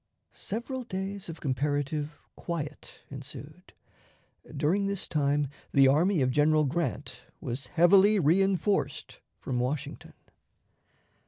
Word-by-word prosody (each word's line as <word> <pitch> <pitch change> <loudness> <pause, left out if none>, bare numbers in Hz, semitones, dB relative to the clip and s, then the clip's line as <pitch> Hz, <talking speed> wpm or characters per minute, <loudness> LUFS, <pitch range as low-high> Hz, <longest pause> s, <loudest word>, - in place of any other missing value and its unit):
Several 250 +4 -4
days 195 -3 -5
of 165 -1 -7
comparative 145 +2 -1 0.2
quiet 155 -4 -6
ensued. - - -9 0.9
During 180 +8 +1
this 200 -1 -3
time 145 -1 +1 0.3
the 135 -2 +6
army 160 +3 +3
of 130 - +1
General 150 +2 +3
Grant 140 -2 -3 0.2
was 125 +3 -5
heavily 190 +5 +5
reënforced 195 +4 +1 0.2
from 125 -2 -3
Washington. 130 +3 -4
155 Hz, 100 wpm, -28 LUFS, 145-190 Hz, 0.9 s, the